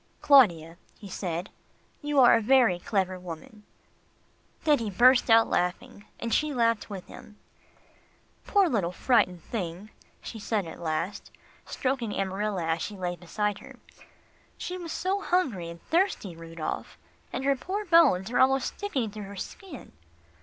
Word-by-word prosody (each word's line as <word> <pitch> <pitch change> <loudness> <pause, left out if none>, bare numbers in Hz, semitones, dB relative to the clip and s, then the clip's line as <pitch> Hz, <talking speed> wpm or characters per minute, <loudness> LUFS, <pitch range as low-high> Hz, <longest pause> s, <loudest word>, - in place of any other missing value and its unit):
"Claudia," 170 - +4 0.2
he 205 - -11
said, 180 -1 -4 0.5
"you 295 -2 +1
are 250 - +7
a - - +4
very 235 -6 +4
clever 185 -1 -1
woman," 180 +4 -10 1.0
then 300 -3 +4
he 225 -2 -3
burst 245 +6 +5
out 225 0 +6
laughing, 180 +3 -2
and 230 -1 -3
she 300 -2 +1
laughed 230 -2 +1
with 195 -3 -7
him. 210 -1 -13 1.1
"Poor 400 -2 +4
little 200 - 0
frightened 180 -5 +1
thing," 195 -1 -5 0.3
she 225 - -8
said 210 -2 -1
at 165 - -9
last, 165 +4 -3 0.4
stroking 255 -5 -2
Amarilla 195 -1 -2
as 165 0 -1
she 210 - -5
lay 180 -1 -3
beside 205 +4 -3
her. - - -13 0.8
"She 360 - -5
was 345 -3 -7
so 385 +3 -1
hungry 250 - 0
and 170 0 -10
thirsty, 330 - 0
Rudolph. 165 -1 -6 0.3
And - - -4
her 275 0 +3
poor 390 +10 -4
bones 300 - +4
are - - +1
almost 265 0 +2
sticking 270 - -2
through 210 -1 -7
her 200 +1 -9
skin." 295 - -9
210 Hz, 150 wpm, -27 LUFS, 180-270 Hz, 1.1 s, are